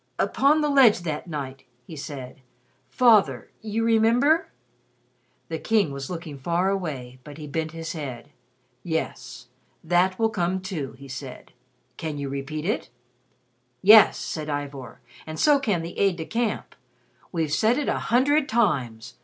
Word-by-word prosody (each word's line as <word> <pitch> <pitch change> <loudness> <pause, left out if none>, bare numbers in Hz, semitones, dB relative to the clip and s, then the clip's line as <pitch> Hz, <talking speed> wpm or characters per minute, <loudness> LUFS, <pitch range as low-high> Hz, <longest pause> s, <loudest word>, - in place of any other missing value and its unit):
"Upon 295 +3 +3
the 300 - +1
ledge 250 -9 +6
that 155 -1 -4
night 135 -4 -6
" 125 0 -41
he 160 - -10
said, 135 -3 -8 0.5
"Father, 205 - +3
you 220 +1 -2
remember 230 +8 +3 0.6
?" 125 0 -42
The 160 -1 -3
King 210 -7 +1
was 140 -1 -6
looking 165 -5 -7
far 175 +6 0
away, 135 -10 -4
but 145 -1 -11
he 155 - -8
bent 160 +2 -3
his 165 +1 -6
head: 135 -7 -7 0.5
"Yes. 125 -6 -4 0.3
That 180 +3 +2
will 225 -1 +1
come, 185 -1 -1
too," 180 -8 -5
he 140 +1 -12
said. 130 0 -9 0.4
"Can 155 -3 -4
you 140 -1 -4
repeat 140 +3 -5
it?" 210 - -2 0.9
"Yes," 210 +2 +8
said 155 -1 -5
Ivor, 140 -4 -5 0.3
"and 155 0 -6
so 295 -2 +5
can 205 -11 0
the 170 - -7
aide 195 -2 +3
de 160 -2 -6
camp. 230 +1 -2 0.6
We've 160 -4 -1
said 220 +9 +3
it 295 - -1
a - - 0
hundred 280 +5 +3
times. 125 - 0
160 Hz, 155 wpm, -25 LUFS, 140-215 Hz, 0.9 s, Yes